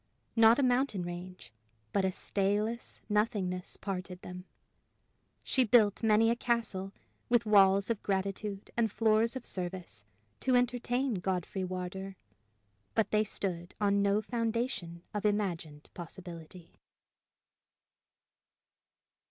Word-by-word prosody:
Not 225 0 +7
a 285 - +2
mountain 250 -6 +2
range, 175 -4 -8 0.4
but 200 - +2
a 190 - +2
stayless 210 +5 -1
nothingness 210 -4 -1
parted 185 -2 -5
them. 180 0 -8 1.0
She 260 - +3
built 215 -3 +4
many 225 0 +4
a - - +2
castle, 225 -6 -1 0.4
with 235 -1 +3
walls 200 0 +5
of 225 - -2
gratitude 195 +1 -2
and 225 -2 +1
floors 225 +2 +2
of 260 - -6
service 180 - -5 0.4
to 260 -1 +2
entertain 245 -1 +1
Godfrey 185 +1 -2
Wardour; 185 +1 -5 0.8
but 220 - +1
they 215 0 +3
stood 175 -4 -3
on 200 -1 +3
no 200 +2 +2
foundation 230 -7 -2
of 210 - -2
imagined 175 -8 -2
possibility. 175 -1 -10
200 Hz, 110 wpm, -31 LUFS, 185-225 Hz, 1.0 s, Not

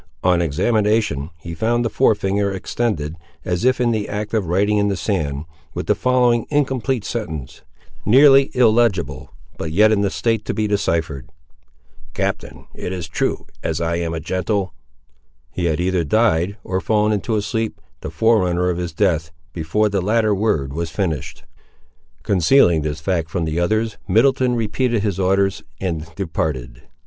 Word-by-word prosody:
On 90 -1 +3
examination, 100 - +1
he 85 +1 -8
found 120 +7 0
the - - +3
fore 110 - +3
finger 100 0 0
extended, 95 -5 -2 0.3
as 90 -1 -1
if 130 0 +3
in 120 -1 +2
the 110 -2 -2
act 105 +1 -4
of 105 -6 0
writing 100 +4 +2
in 100 - +2
the 100 -2 -1
sand, 80 -8 -2 0.3
with - - -3
the - - +3
following 125 -2 +2
incomplete 135 -5 0
sentence, 80 - -5 0.4
nearly 135 +3 +6
illegible, 115 -6 +2 0.3
but 80 - -3
yet 105 +6 +5
in 105 -2 +2
a 100 - +1
state 115 +2 -1
to - - -3
be 110 - 0
deciphered: 80 -9 -1 0.9
"Captain, - - -3
it - - -5
is 90 -3 -4
true, 80 - -2 0.2
as 80 0 -2
I 85 0 -1
am 85 -1 -2
a 80 - -3
gentle—" 95 +3 -2 0.8
He 90 - -3
had 80 -1 0
either 90 -1 +1
died, 100 +1 +1
or 95 0 -2
fallen 105 +2 +2
into 105 +2 -1
a 105 - 0
sleep, 110 0 -2 0.2
the - - -6
forerunner 90 -6 +2
of 90 - -3
his 85 -2 -4
death, 80 -1 +1 0.2
before 90 +6 0
the 100 -2 -1
latter 110 +2 +2
word 80 -10 0
was 85 +2 -3
finished. 80 -6 -3 0.8
Concealing 90 - +4
this 75 0 -3
fact 85 -2 -1
from 85 -2 -2
the 80 +1 -2
others, 110 +5 0
Middleton 125 +1 +3
repeated 115 0 0
his 100 -3 -1
orders 95 +1 +1 0.2
and 85 -4 -3
departed. 65 -9 -3
100 Hz, 165 wpm, -20 LUFS, 85-110 Hz, 0.9 s, nearly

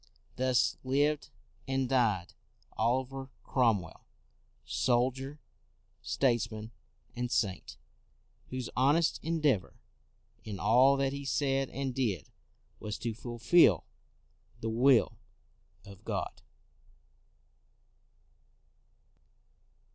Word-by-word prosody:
r - - -30 0.3
Thus 130 -1 +2
lived 145 +3 +1 0.4
and 135 -1 0
died 110 -9 +1 0.4
Oliver 130 +3 -1
Cromwell, 110 -10 0 0.6
soldier, 130 +3 0 0.6
statesman, 115 -4 -1 0.4
and 120 0 -2
saint, 100 -4 -1 0.7
whose 130 -2 -4
honest 145 +6 +3
endeavor 150 - 0 0.7
in 105 -3 -6
all 130 +6 +5
that 135 0 0
he 140 0 -5
said 135 0 0
and 135 -1 -3
did 110 - -2 0.5
was 105 0 -5
to 115 -1 -3
fulfil 120 - +3 0.7
the 115 - -3
will 125 +1 +3 0.7
of 100 -1 -13
God. - - -4
125 Hz, 85 wpm, -31 LUFS, 115-135 Hz, 0.7 s, all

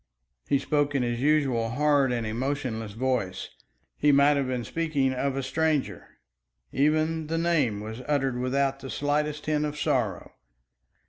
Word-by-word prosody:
He 140 - +3
spoke 145 0 0
in 135 - +2
his 120 0 -2
usual 135 -6 +2
hard 140 +1 +2
and 120 -2 -1
emotionless 115 -2 -3
voice. 115 -6 -2 0.5
He 150 - +4
might 140 +1 +5
have 140 -2 0
been 125 -2 -2
speaking 145 -1 0
of 135 +1 -1
a 135 - -2
stranger. 155 0 -1 0.5
Even 155 +2 +1
the 165 +1 -1
name 150 -11 +1
was 110 +3 -7
uttered 135 -4 0
without 135 +2 0
the 135 - -8
slightest 150 +1 -1
hint 150 -1 +1
of 150 0 -3
sorrow. 125 - -1
140 Hz, 150 wpm, -27 LUFS, 125-150 Hz, 0.5 s, might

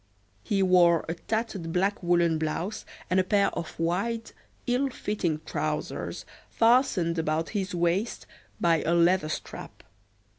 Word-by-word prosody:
He 195 - 0
wore 175 -3 +4
a 165 - -1
tattered 200 -2 -3
black 195 +4 0
woolen 170 -2 +2
blouse 170 +7 -3 0.2
and 180 +1 +2
a - - +4
pair 200 +1 +2
of 165 - -6
wide, 200 +8 -1 0.3
ill 255 +3 +1
fitting 180 -10 -2
trousers, - - -3 0.2
fastened 225 -8 +3
about 160 0 -1
his 190 -4 -3
waist 175 +6 0 0.3
by 165 -2 +3
a 170 - +1
leather 170 -1 +3
strap. - - -7
180 Hz, 135 wpm, -27 LUFS, 165-205 Hz, 0.3 s, wore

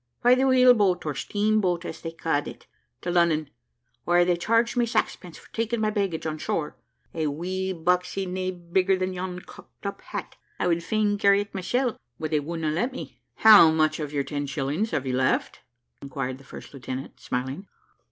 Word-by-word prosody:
"By 245 +1 +7
the 260 +1 +3
wheel 255 -1 +7
boat, 200 -7 +1
or 150 - -1
steam 215 +8 0
boat, 175 -2 0
as - - -7
they 165 - -4
ca'd 165 -3 -1
it, - - -10 0.4
to 175 - -2
Lunnon: 165 -4 +2 0.5
where 175 0 +4
they 175 0 +2
charged 230 +6 +1
me 240 -1 +2
sax 230 - 0
pence 175 -4 -12
for - - -18
taking 230 +1 -1
my 215 -1 +1
baggage 195 -7 -2
on 155 -1 -3
shore 150 -1 -2 0.4
a 160 -2 -1
wee 185 +6 -3
boxy 180 +2 0
nae 185 0 -2
bigger 185 +2 +1
than 185 0 -2
yon 180 0 -5
cocked - - -16
up 200 0 -4
hat. - - -7 0.2
I - - -1
would 170 -1 +1
fain 210 +1 0
carry 200 0 +5
it 205 - -8
mysel', 245 +6 -1 0.2
but 155 0 -3
they 155 - +3
wudna 160 +1 -3
let 180 - 0
me." 260 - -9
"How 210 -7 +9
much 155 0 +1
of 150 -2 -4
your 145 -2 0
ten 145 0 -4
shillings 150 +9 -1
have 140 -10 -2
you 130 -1 -1
left?" 130 0 0 0.4
inquired 130 -1 -4
the 135 - -17
first - - -11
lieutenant, 130 0 -7
smiling. 130 +10 -4
180 Hz, 200 wpm, -25 LUFS, 155-205 Hz, 0.5 s, How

